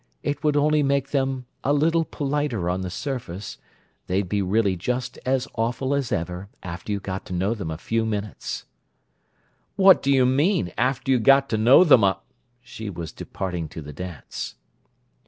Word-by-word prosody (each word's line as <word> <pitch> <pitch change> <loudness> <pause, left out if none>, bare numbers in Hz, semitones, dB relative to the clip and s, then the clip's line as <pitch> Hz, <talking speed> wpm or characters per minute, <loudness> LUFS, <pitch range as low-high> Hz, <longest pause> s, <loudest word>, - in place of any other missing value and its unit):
"It 145 0 -2
would 150 -1 +2
only 150 +1 +3
make 140 -1 0
them 135 -2 0 0.2
a 140 - +1
little 165 +3 +3
politer 140 - -1
on 90 +1 -2
the 90 - -3
surface—they'd 95 - -5
be 100 +2 0
really 100 0 +2
just 125 +7 -3
as 130 0 +1
awful 120 +4 -1
as 140 -3 -1
ever, 90 +3 -3
after 90 +4 -6
you 100 - 0
got 95 -1 -5
to - - -6
know 95 +5 +1
them 100 -8 -5
a 80 - -4
few 115 +7 -1
minutes." 105 -2 -4 1.1
"What 190 -1 +7
do 140 - +1
you 130 -2 +5
mean: 140 - +2
'after 130 +3 0
you 130 - +4
got 135 +3 +5
to 110 - 0
know 125 +10 +7
them 135 - +6
a—'" 95 -1 +2 0.4
She 110 -3 -7
was 85 -4 -6
departing 90 -4 -4
to 80 - -8
the 75 +1 -9
dance. 90 0 -7
115 Hz, 175 wpm, -24 LUFS, 95-140 Hz, 1.1 s, What